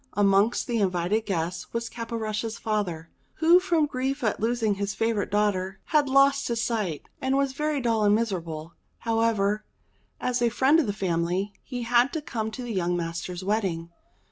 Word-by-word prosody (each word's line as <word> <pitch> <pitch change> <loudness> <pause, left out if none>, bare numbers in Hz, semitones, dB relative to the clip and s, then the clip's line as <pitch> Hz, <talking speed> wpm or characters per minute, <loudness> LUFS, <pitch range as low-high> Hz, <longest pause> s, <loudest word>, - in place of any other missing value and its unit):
Amongst 200 +2 +3
the 235 -2 -1
invited 190 +3 0
guests 175 -2 -2
was 230 0 -2
Caporushes' 225 -1 -4
father, 180 -7 -2 0.2
who 335 +3 +6
from 345 -4 +2
grief 270 0 -2
at 215 - 0
losing 225 -1 +1
his 200 0 -3
favourite 225 -2 0
daughter, 195 -2 0
had 295 -3 +2
lost 275 +1 +4
his 235 -1 -1
sight, 215 -9 -1 0.2
and 265 +1 +1
was 275 -1 +1
very 300 +1 -1
dull 230 -4 +1
and 205 0 +5
miserable. 170 -8 -3 0.2
However, 225 -2 +1 0.6
as 250 -1 -1
a 240 - +4
friend 270 +7 +4
of 295 - +1
the - - +1
family, 185 0 -1
he 245 -3 -5
had 240 +3 +3
to 320 - -2
come 220 -6 -3
to 235 +3 -7
the 240 -2 -4
young 175 -2 0
master's 175 +2 -4
wedding. 185 -5 -1
220 Hz, 170 wpm, -26 LUFS, 190-245 Hz, 0.6 s, who